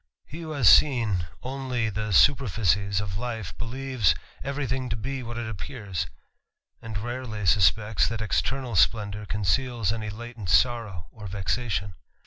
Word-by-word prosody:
He 155 - -9
who 160 -1 -6
.bas 140 -8 +2
seen 110 - +5 0.2
only 130 -4 -2
the 105 +1 -3
superficies 100 -5 +3
of 100 -1 -4
life 115 -6 -4
beljeve3_ 120 - +1 0.3
every 140 +1 -2
thing 130 0 -2
to - - -1
t>e 135 +4 -4
what 120 -1 -6
it 120 -1 -3
appears, 100 - -4 0.7
and 110 -2 -6
rarely 115 -2 -4
suspects 105 +4 +4
chat._ 115 -2 -3
extern^ 135 +5 0
spTehHour 105 +1 +2
conceals 105 +2 0
any 110 -2 -4
latent 115 -2 -7
sorrow 105 -1 +2
or 105 -2 -9
vexation. 100 +1 -2
110 Hz, 140 wpm, -26 LUFS, 100-125 Hz, 0.7 s, seen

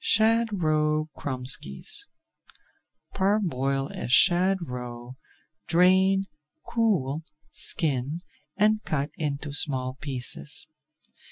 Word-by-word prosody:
SHAD 220 -3 +3
ROE 155 0 +1
KROMESKIES 125 - -1 1.1
Parboil 140 -9 0
a - - -5
shad 180 +9 +5
roe, 125 -1 -7 0.5
drain, 190 +3 +4 0.4
cool, 170 - 0 0.3
skin, 150 0 0 0.4
and 215 +1 +3
cut 145 -1 -2
into 145 -1 -3
small 130 -3 0
pieces. 125 - -2
155 Hz, 80 wpm, -26 LUFS, 130-190 Hz, 1.1 s, shad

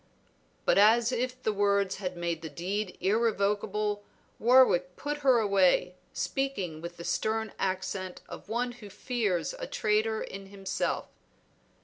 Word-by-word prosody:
But - - +4
as 225 +3 +5
if 255 +1 -2
the 215 - +1
words 200 -1 +1
had 185 -2 -4
made 170 -2 -2
the 160 - -6
deed 185 +5 -3
irrevocable, 210 0 +1 0.4
Warwick 220 -8 +5
put 295 +1 -3
her 265 -4 +5
away, 195 -4 +3 0.2
speaking 195 -13 -2
with 170 +1 -7
the 170 - -7
stern 220 +3 -1
accent 185 -1 -3
of - - -10
one 245 +2 -1
who 225 -4 -11
fears 210 - -1
a - - -4
traitor 215 +1 0
in 195 0 -8
himself. 195 -1 -2
205 Hz, 135 wpm, -29 LUFS, 185-230 Hz, 0.4 s, as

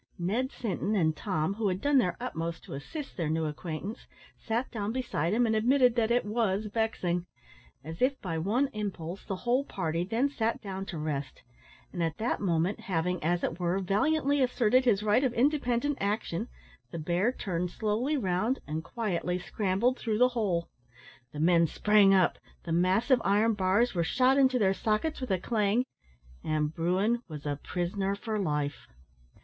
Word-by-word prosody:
Ned 215 +9 -1
Sinton 210 -1 -2
and 160 -5 +2
Tom, 185 -2 -1
who 215 0 -1
had 185 -1 0
done 285 +4 +3
their 180 -7 0
utmost 170 -9 -4
to - - -9
assist 275 - -7
their 165 -4 -2
new 160 0 0
acquaintance, 160 +6 -5 0.3
sat 235 +3 -3
down 215 -2 -2
beside 230 - -1
him 240 +3 +3
and 220 -1 +1
admitted 250 +2 +4
that 230 -2 +1
it 240 -1 +2
was 210 -2 0
vexing. 180 -6 -1 0.6
As 160 +3 -8
if 265 +1 +2
by 165 -4 -3
one 235 - +1
impulse, 195 -4 -5
the 195 - -4
whole 245 +7 +1
party 170 - -2
then 225 +8 +1
sat 230 -5 -1
down 195 -1 -6
to 170 - -5
rest, 145 -3 -4 0.5
and 175 - -3
at 165 -1 -1
that 230 +3 -1
moment, 175 0 0
having, 180 -1 -2
as 175 +2 +1
it 165 - -2
were, 175 +1 0
valiantly 280 - +1
asserted 255 0 +3
his 210 -4 +3
right 215 +5 +3
of 250 -2 0
independent 275 0 +1
action, 205 0 -1 0.4
the 170 - -6
bear 175 +8 +1
turned 180 -7 -3
slowly 225 - -1
round 215 +3 0
and 155 +1 -4
quietly 180 -6 -2
scrambled 205 +7 0
through 220 -3 -1
the 250 +2 +5
hole. 200 -9 -1 0.6
The 150 - -7
men 170 +1 +4
sprang 210 +4 +4
up; 185 -2 +3 0.2
the 165 - -5
massive 190 +9 +3
iron 210 +3 +3
bars 205 +4 +2
were 170 -2 +1
shot 255 +10 +3
into 260 -2 +4
their 195 -5 +3
sockets 220 +10 -1
with 255 - -4
a 190 - +2
clang; 215 +4 +1 0.6
and 155 0 0
bruin 190 +9 +1
was 150 -3 -8
a 145 -1 -2
prisoner 190 +3 -2
for 215 +1 -3
life. 150 -5 -2
200 Hz, 175 wpm, -29 LUFS, 175-240 Hz, 0.6 s, the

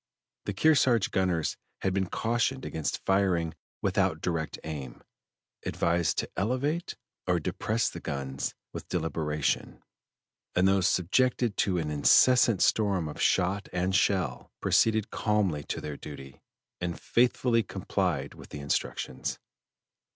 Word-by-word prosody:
The 100 - -2
Kearsarge 125 -5 +4
gunners 90 -4 0 0.3
had 95 - +1
been 95 -2 0
cautioned 120 +3 0
against 80 -2 -3
firing 95 -4 +2 0.3
without - - +1
direct 80 -3 -2
aim, 70 -6 -7 0.6
advised 85 0 0
to - - -1
elevate 130 - -1 0.3
or - - +2
depress 115 +2 -1
the - - -5
guns 70 -1 -4 0.2
with - - -7
deliberation, 80 -3 -1 0.7
and 90 +1 +4
though 95 0 +3
subjected 115 +6 +2
to 95 -3 +1
an 80 -3 -2
incessant 115 - +5
storm 100 -6 +2
of 75 - -6
shot 95 +2 +1
and 90 +1 0
shell, 95 -10 +1
proceeded 110 -2 +2
calmly 100 -9 0
to - - -3
their 75 -2 -6
duty, 70 -3 -10 0.4
and 90 -1 -3
faithfully 120 -1 +2
complied 90 -7 -2
with - - -13
the 75 - -7
instructions. 70 -2 -2
95 Hz, 125 wpm, -28 LUFS, 80-110 Hz, 0.7 s, incessant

